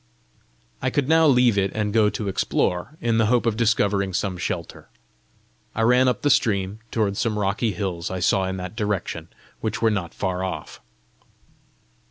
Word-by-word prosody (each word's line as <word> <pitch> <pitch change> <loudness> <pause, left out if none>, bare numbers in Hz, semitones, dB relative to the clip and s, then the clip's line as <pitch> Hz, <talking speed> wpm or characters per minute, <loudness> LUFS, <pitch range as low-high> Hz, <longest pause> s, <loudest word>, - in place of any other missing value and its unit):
I - - +1
could 140 -3 0
now 160 +1 +5
leave 125 -6 +4
it 95 0 0
and 105 -1 -1
go 110 -2 +4
to 105 0 -4
explore, 95 - -1
in 115 -1 +1
the 110 - +3
hope 120 +1 +2
of 115 -2 +1
discovering 100 -4 +1
some 95 -1 -1
shelter. 85 -1 -5 0.9
I 115 - +1
ran 125 +2 +4
up 125 - 0
the 145 - +3
stream 100 -3 +1
toward 100 -3 0
some 110 -2 0
rocky 105 +2 0
hills 90 -3 -3
I 95 - -4
saw 95 +2 +2
in 95 0 -3
that 90 +3 -6
direction, 105 -4 -3 0.3
which 110 -1 -3
were 115 -1 +3
not 95 -5 -3
far 95 -1 -2
off. 95 - -6
105 Hz, 175 wpm, -23 LUFS, 95-115 Hz, 0.9 s, now